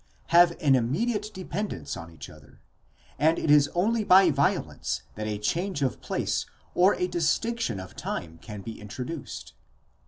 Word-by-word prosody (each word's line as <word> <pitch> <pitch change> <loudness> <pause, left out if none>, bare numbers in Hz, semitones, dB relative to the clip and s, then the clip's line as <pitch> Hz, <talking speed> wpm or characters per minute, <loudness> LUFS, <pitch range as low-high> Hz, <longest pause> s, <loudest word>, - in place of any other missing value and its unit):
have 170 0 +6
an 140 -3 +4
immediate 210 - 0
dependence 185 - -4
on 85 0 -8
each 80 -5 -10
other, - - -16 0.6
and 160 +2 +4
it 150 - +1
is 145 -1 +6
only 215 +5 +2
by 190 -3 +6
violence 140 0 -1
that 110 0 -5
a 105 -1 -2
change 165 - -1
of 130 - -1
place - - -1 0.3
or 185 +3 +4
a 180 - 0
distinction 175 - 0
of 95 0 -9
time 80 0 -5
can 105 -3 -8
be 110 0 -8
introduced.? 125 +8 -7
150 Hz, 155 wpm, -27 LUFS, -, 0.6 s, have